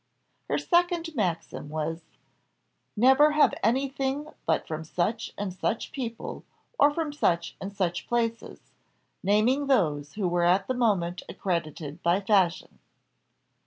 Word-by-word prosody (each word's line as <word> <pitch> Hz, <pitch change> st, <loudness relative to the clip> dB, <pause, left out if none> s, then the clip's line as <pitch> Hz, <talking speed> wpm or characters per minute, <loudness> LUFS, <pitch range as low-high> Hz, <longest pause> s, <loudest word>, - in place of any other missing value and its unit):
Her -, -, +1 dB
second 345 Hz, -2 st, +1 dB
maxim 175 Hz, -, -2 dB
was 160 Hz, +2 st, -3 dB, 1.0 s
"Never 265 Hz, +6 st, +6 dB
have 300 Hz, -, +4 dB
anything 270 Hz, +5 st, 0 dB, 0.2 s
but 160 Hz, -, +1 dB
from 160 Hz, 0 st, -4 dB
such 180 Hz, +8 st, -2 dB
and 200 Hz, -2 st, -3 dB
such 220 Hz, +4 st, -2 dB
people, 240 Hz, -6 st, -5 dB, 0.4 s
or 290 Hz, -, +7 dB
from 300 Hz, -1 st, -3 dB
such 170 Hz, -12 st, 0 dB
and 195 Hz, -, -5 dB
such 185 Hz, -3 st, -2 dB
places," 230 Hz, -1 st, -2 dB, 0.5 s
naming 225 Hz, +9 st, +2 dB
those 150 Hz, -, +1 dB
who 205 Hz, -3 st, -1 dB
were 175 Hz, 0 st, +1 dB
at 185 Hz, +3 st, +3 dB
the 255 Hz, -, -1 dB
moment 195 Hz, -8 st, +1 dB
accredited 165 Hz, -3 st, -3 dB
by 175 Hz, +3 st, +2 dB
fashion. 190 Hz, -4 st, +1 dB
205 Hz, 125 wpm, -27 LUFS, 170-265 Hz, 1.0 s, or